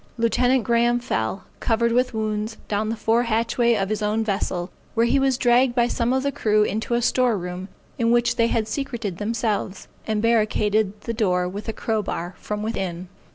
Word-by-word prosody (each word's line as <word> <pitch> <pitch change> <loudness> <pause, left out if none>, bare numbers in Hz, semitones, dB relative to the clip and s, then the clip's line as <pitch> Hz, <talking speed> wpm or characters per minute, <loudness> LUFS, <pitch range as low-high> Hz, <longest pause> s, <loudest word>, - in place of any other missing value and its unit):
Lieut. 245 +2 +2
Graham 240 +1 +2
fell, 190 - -2 0.2
covered 235 0 +1
with 250 +2 +2
wounds, 215 0 -2
down 215 +1 -1
the 225 - -1
fore 225 +1 +2
hatchway 235 +1 +1
of 195 -2 -1
his 215 -1 -2
own 215 +1 +1
vessel, 195 -4 -2 0.2
where 230 0 +3
he 270 +4 +3
was 270 -2 +2
dragged 245 0 +3
by 240 -1 +3
some 240 0 0
of 265 0 +1
the 280 - 0
crew 215 -4 +2
into 220 +3 -1
a 240 - 0
store 245 -3 +2
room, 180 +1 -6 0.3
in 230 -1 +2
which 240 0 +3
they 230 - +3
had 225 -2 0
secreted 230 -7 -4
themselves, 210 -3 -2 0.2
and 215 -1 0
barricaded 215 -2 +1
the 230 - -4
door 180 -5 +1
with 205 +4 -6
a - - +1
crow 220 0 -1
bar 175 -2 -4
from 210 0 -4
within. 185 -5 -3
225 Hz, 195 wpm, -23 LUFS, 210-235 Hz, 0.3 s, where